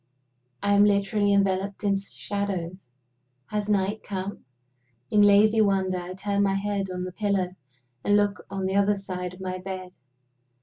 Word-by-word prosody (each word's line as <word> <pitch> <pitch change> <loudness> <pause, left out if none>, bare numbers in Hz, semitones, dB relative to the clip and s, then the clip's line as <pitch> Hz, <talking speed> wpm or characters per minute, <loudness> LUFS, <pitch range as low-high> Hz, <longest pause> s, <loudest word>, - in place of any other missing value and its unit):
I 205 0 +3
am 200 0 +6
literally 205 0 +2
enveloped 195 0 +1
in 200 -1 +2
shadows. 195 -3 -4 0.6
Has 210 0 -2
night 205 +1 +1
come? 195 0 -5 0.7
In 210 - +5
lazy 210 +2 +6
wonder, 190 -3 +1
I 180 +1 -7
turn 200 +1 -1
my 195 -1 +2
head 200 -1 -1
on 180 0 -4
the 185 - -5
pillow, 195 -2 0 0.5
and 205 0 +4
look 205 -2 0
on 195 -1 -3
the 190 +1 -1
other 200 +1 +3
side 180 -2 -5
of 185 - -14
my 185 -1 -4
bed. 185 -1 -6
195 Hz, 160 wpm, -26 LUFS, 185-205 Hz, 0.7 s, am